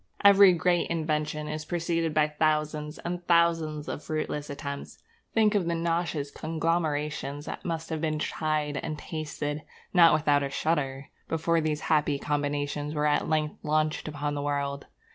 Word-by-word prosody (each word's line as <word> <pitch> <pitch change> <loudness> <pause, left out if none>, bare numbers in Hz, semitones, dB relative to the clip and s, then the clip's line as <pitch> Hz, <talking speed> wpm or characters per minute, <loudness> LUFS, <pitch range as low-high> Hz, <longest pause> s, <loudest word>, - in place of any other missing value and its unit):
Every 200 -1 +9
great 175 +1 +1
invention 155 -2 -1
is 155 0 -4
preceded 165 0 -1
by 150 0 +3
thousands 150 0 0
and 175 0 -4
thousands 165 -3 +2
of - - -5
fruitless 155 -1 -3
attempts. 140 0 -6 0.4
Think 220 -1 +4
of 195 -5 +1
the 170 - +1
nauseous 165 -3 -1
conglomerations 155 -3 -2
that - - -6
must 165 -1 -4
have 160 -1 -2
been 155 -1 0
tried 150 -1 -1
and 155 +1 -4
tasted, 150 -1 -4 0.3
not 170 -3 +7
without 145 -2 +3
a 140 - -1
shudder, 140 -3 -1 0.2
before 165 +1 +1
these 155 -1 -1
happy 150 -2 +2
combinations 145 +1 -2
were 150 0 +1
at 150 0 +2
length 155 -1 0
launched 155 0 0
upon 145 -1 -3
the 145 - -2
world. 140 -1 -2
155 Hz, 155 wpm, -28 LUFS, 145-165 Hz, 0.4 s, Every